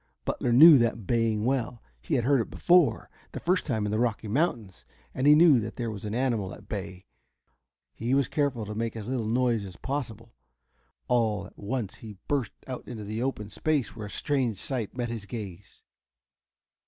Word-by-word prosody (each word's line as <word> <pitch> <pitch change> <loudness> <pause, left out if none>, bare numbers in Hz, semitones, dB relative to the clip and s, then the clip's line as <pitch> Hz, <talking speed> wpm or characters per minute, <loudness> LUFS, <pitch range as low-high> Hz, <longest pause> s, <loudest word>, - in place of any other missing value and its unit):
Butler 120 - -1
knew 150 +4 +9
that 115 -2 0
baying 115 -2 +1
well. 125 -3 -1 0.2
He - - -1
had 120 - +1
heard 135 0 +3
it - - -5
before, 175 -3 +3 0.3
the - - -4
first 180 +2 0
time 110 -7 0
in 105 - -2
the 110 - 0
Rocky 115 -2 -1
Mountains, 110 - -1 0.3
and 130 +2 0
he 150 - +8
knew 155 -5 +6
that 110 0 -5
there 120 -3 -3
was 105 -1 -7
an 105 +1 -3
animal 120 -7 -1
at 100 - -16
bay. 95 -3 -6 0.9
He 120 +4 -1
was 140 -2 +2
careful 140 -7 -1
to 105 - -6
make 115 +1 -3
as 110 -2 -6
little 120 -2 -2
noise 120 -1 +1
as 95 -3 -9
possible. 115 - -5 0.7
All 110 -5 +1
at - - -15
once 110 -1 -4
he 105 -3 -10
burst 140 -5 -1
out 130 -1 -7
into 115 -4 -7
an 110 +3 -4
open 110 -5 -3
space 150 0 -1
where 105 -2 -6
a - - -10
strange 130 -4 -1
sight 125 -3 -4
met 120 -1 -2
his 110 -4 -6
gaze. 100 -5 -8
115 Hz, 190 wpm, -27 LUFS, 105-130 Hz, 0.9 s, knew